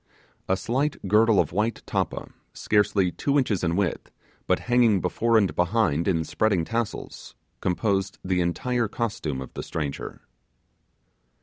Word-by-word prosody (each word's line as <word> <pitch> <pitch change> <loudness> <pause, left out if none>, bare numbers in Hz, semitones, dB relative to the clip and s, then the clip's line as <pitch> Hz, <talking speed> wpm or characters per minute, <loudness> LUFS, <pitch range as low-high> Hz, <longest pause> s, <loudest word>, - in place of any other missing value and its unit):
A 95 - +3
slight 135 +8 -1
girdle 105 +1 +4
of 80 - +1
white 105 +6 -1
tappa, - - -2 0.2
scarcely 105 -3 +2
two 140 +8 0
inches 110 -10 +1
in 85 -1 +1
width, 95 -4 -1 0.4
but - - +2
hanging 120 -5 +3
before 115 +5 +1
and 100 -4 +2
behind 90 -4 +1
in 85 -4 +1
spreading 95 0 +1
tassels, 115 +1 -4 0.2
composed 95 +1 0
the 90 -1 +1
entire 120 +7 0
costume 100 - -3
of 65 - -9
the - - -5
stranger. 75 -4 -5
100 Hz, 135 wpm, -25 LUFS, 90-115 Hz, 0.4 s, girdle